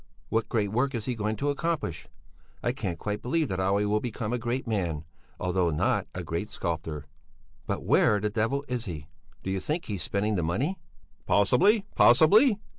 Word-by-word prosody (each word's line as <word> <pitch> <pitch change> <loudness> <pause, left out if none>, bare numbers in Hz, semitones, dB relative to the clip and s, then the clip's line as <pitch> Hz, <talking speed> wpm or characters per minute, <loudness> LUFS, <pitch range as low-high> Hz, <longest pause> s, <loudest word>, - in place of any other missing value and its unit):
What 115 0 0
great 105 -4 0
work 130 +4 +1
is 110 -2 -3
he 125 - -1
going 110 -1 -2
to 145 +7 0
accomplish? 145 - -2 0.6
I 120 - +2
can 100 -9 -3
quite 105 +6 -4
believe 155 +4 0
that 95 - -2
Olle 100 +2 +2
will 105 +1 +2
become 115 -1 -3
a 125 - 0
great 120 +3 -2
man, 85 -9 -2 0.3
although 90 -1 +1
not 75 - +1
a - - -4
great 85 +6 -3
sculptor. 80 -4 -4 0.6
But - - -2
where 105 - +4
the 105 +1 -1
devil 115 +6 0
is 125 -2 -2
he? 80 -7 -6 0.4
Do 95 - -2
you 95 - 0
think 155 - -2
he's 100 -5 -4
spending 100 +6 0
the - - +1
money?" 120 - -1 0.5
"Possibly, 190 - +4
possibly! 205 - +6
105 Hz, 185 wpm, -28 LUFS, 95-125 Hz, 0.6 s, possibly